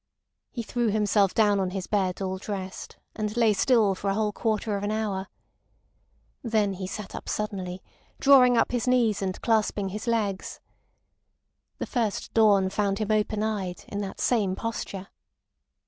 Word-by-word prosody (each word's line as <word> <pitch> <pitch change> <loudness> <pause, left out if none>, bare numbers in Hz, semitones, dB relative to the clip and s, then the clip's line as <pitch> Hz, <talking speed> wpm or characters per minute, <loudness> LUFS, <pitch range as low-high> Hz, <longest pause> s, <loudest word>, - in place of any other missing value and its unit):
He 235 - -5
threw 240 +2 -1
himself 205 -2 +2
down 205 -2 +4
on 190 -1 0
his 185 0 -4
bed 195 -2 -1
all 190 0 -3
dressed, 190 -2 -6 0.2
and 215 +1 -3
lay 225 -3 +4
still 220 -2 +3
for 195 +1 -3
a 195 - 0
whole 215 -1 0
quarter 215 0 -1
of 200 - -3
an 205 - -1
hour. 210 -3 -2 1.1
Then 215 -5 +1
he 185 0 -5
sat 210 0 -7
up - - -7
suddenly, 190 -3 -4 0.4
drawing 255 -3 +6
up - - +2
his 245 0 -1
knees, 235 -5 +2
and 190 -1 -2
clasping 210 -3 +1
his 210 +5 -6
legs. 210 -5 -1 1.2
The - - -3
first 230 -6 -2
dawn 200 -4 +4
found 200 -1 0
him 215 0 -1
open 215 0 +1
eyed, 195 -5 -3
in 205 - -3
that 195 -1 -6
same 205 -6 +1
posture. 200 -3 -5
210 Hz, 165 wpm, -26 LUFS, 195-220 Hz, 1.2 s, drawing